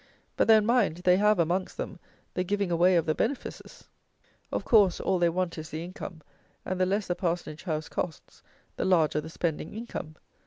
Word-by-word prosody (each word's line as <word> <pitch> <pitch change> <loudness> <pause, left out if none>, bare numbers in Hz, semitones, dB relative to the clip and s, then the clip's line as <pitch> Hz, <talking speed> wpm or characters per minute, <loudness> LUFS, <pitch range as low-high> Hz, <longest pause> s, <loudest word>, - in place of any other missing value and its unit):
But, - - +2
then, 220 -2 +6
mind, 225 -8 +2
they 180 0 +5
have, 210 +1 +4
amongst 175 +3 0
them, - - -5 0.3
the 180 - 0
giving 200 0 -1
away 175 +2 +4
of 165 -2 +3
the 155 - +1
benefices! 255 - -4 0.6
Of - - -2
course, 205 -7 +5
all 190 -1 +1
they 175 -1 +4
want 170 -1 -2
is 155 0 -7
the 160 +1 -5
income, 175 -2 -8 0.4
and, 185 0 -2
the 185 - +3
less 200 +2 0
the 175 - 0
parsonage 175 -3 -3
house 155 -3 -2
costs, 165 -5 -5 0.4
the - - -1
larger 160 -5 +3
the 160 - -8
spending 165 +1 -3
income. 200 -8 -6
180 Hz, 190 wpm, -28 LUFS, 165-195 Hz, 0.6 s, then